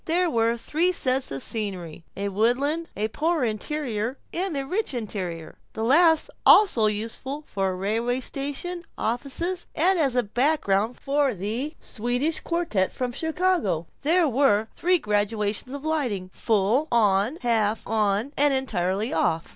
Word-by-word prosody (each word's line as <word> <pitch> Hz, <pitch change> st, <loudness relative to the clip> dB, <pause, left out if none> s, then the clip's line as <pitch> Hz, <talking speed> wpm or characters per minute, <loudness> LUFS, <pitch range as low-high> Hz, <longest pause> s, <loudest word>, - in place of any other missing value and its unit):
There 345 Hz, +1 st, +1 dB
were 230 Hz, 0 st, +1 dB
three 320 Hz, +9 st, +1 dB
sets 260 Hz, -6 st, 0 dB
of 135 Hz, -1 st, -4 dB
scenery: 185 Hz, -7 st, -4 dB
a 200 Hz, +1 st, -2 dB
woodland, 265 Hz, -, 0 dB
a 210 Hz, +1 st, 0 dB
Poor 320 Hz, +4 st, 0 dB
Interior, 235 Hz, +1 st, -2 dB, 0.2 s
and 355 Hz, -3 st, -1 dB
a 275 Hz, -, -2 dB
Rich 370 Hz, -2 st, -1 dB
Interior, 185 Hz, -8 st, -5 dB
the 220 Hz, -, -3 dB
last 320 Hz, +6 st, +4 dB
also 255 Hz, -, +6 dB
useful 230 Hz, +7 st, -4 dB
for 190 Hz, -5 st, -2 dB
railway 225 Hz, +6 st, -1 dB
stations, 290 Hz, +7 st, -4 dB
offices, 280 Hz, +10 st, -2 dB
and 360 Hz, +3 st, +3 dB
as 275 Hz, -5 st, +2 dB
a 245 Hz, -, +3 dB
background 230 Hz, -2 st, +1 dB
for 280 Hz, -3 st, +1 dB
the 225 Hz, -, -3 dB
Swedish 245 Hz, +8 st, -1 dB
Quartette 335 Hz, -, -1 dB
from 250 Hz, -1 st, -3 dB
Chicago. 320 Hz, -, 0 dB, 0.2 s
There 330 Hz, +3 st, +3 dB
were 225 Hz, -5 st, +2 dB
three 360 Hz, +1 st, +3 dB
gradations 210 Hz, -, -1 dB
of 285 Hz, +2 st, -7 dB
lighting: 245 Hz, -13 st, -1 dB
full 225 Hz, +7 st, +1 dB
on, 210 Hz, +2 st, +3 dB
half 225 Hz, -3 st, +1 dB
on, 215 Hz, +4 st, 0 dB
and 285 Hz, -1 st, +3 dB
entirely 205 Hz, -4 st, -1 dB
off. 165 Hz, 0 st, 0 dB
245 Hz, 140 wpm, -25 LUFS, 210-300 Hz, 0.2 s, also